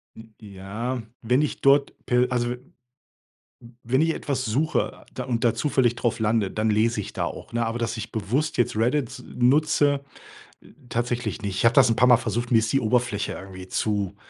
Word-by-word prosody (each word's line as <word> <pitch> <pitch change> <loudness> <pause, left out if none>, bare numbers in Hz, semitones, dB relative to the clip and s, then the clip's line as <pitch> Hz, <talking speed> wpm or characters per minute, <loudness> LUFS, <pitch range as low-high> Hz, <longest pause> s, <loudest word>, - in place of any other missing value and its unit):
N 110 0 -14
ja, 105 +5 -5 0.2
wenn 125 +4 +2
ich 150 - -2
dort 140 +1 +4
per 125 0 +3
also, 120 -1 0
w - - 0
m 125 +2 -15 1.1
wenn 130 +3 +1
ich 165 +1 +3
etwas 135 -4 -3
suche, 140 +8 -1
da 130 - -4
und 120 -2 -2
da 115 - +3
zufällig 130 -5 +1
drauf 120 -1 -1
lande, 110 -3 +1
dann 110 +3 -1
lese 110 +1 +2
ich 100 - -7
da - - -2
auch, - - -8
ne, 120 0 0
aber 115 +1 -2
dass 115 -1 -2
ich 110 - -6
bewusst 120 +9 -1
jetzt 120 - +1
Reddit 125 +3 0
nutze, 140 +2 +3 0.6
äh, - - -18 0.2
tatsächlich 120 -1 -2
nicht. 100 -2 -3
Ich 95 - -1
habe 115 - +6
das 135 -4 +6
'n 115 - +1
paar 125 - +4
Mal 125 - +8
versucht. 120 0 -3
Mir 115 - +6
ist 110 -1 0
die 135 - +4
Oberfläche 115 -2 0
irgendwie 95 -1 -9
zu 100 -1 -1
120 Hz, 200 wpm, -24 LUFS, 110-130 Hz, 1.1 s, Mal